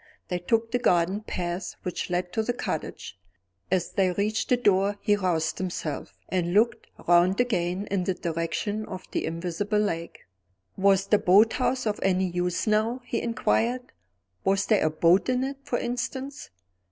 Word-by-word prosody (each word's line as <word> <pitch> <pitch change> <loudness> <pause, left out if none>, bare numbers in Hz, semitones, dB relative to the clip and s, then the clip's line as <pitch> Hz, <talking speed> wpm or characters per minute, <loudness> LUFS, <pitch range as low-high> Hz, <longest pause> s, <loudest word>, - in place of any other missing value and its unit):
They 180 - -1
took 225 +5 0
the 245 - +1
garden 185 -2 +2
path 175 -3 -4
which 180 - -3
led 180 0 -2
to 220 - +1
the 240 +2 -1
cottage. 100 - -5 0.5
As 180 -1 0
they 190 -2 +2
reached 210 +4 -1
the 250 - +4
door 200 -3 +2
he 205 - +2
roused 175 -5 0
himself, 180 -5 -4
and 175 -1 -1
looked 225 +1 +2 0.2
round 175 +3 +4
again 190 -5 0
in 190 -3 0
the 190 - 0
direction 170 +6 -2
of 185 -2 -7
the - - -1
invisible 175 +5 -2
lake. 170 -5 -2 0.5
"Was 195 0 +3
the 210 +1 +3
boat 205 +5 +5
house 255 0 0
of 210 -1 -1
any 190 0 +2
use 180 0 -1
now," 220 +3 +1
he 235 - -2
inquired 240 +1 0 0.5
"was 195 +1 +2
there 215 -3 +3
a 155 - +3
boat 170 +7 +3
in 255 0 +1
it, 275 +1 -3
for 250 -3 -1
instance?" 260 +3 -4
195 Hz, 165 wpm, -26 LUFS, 180-225 Hz, 0.5 s, boat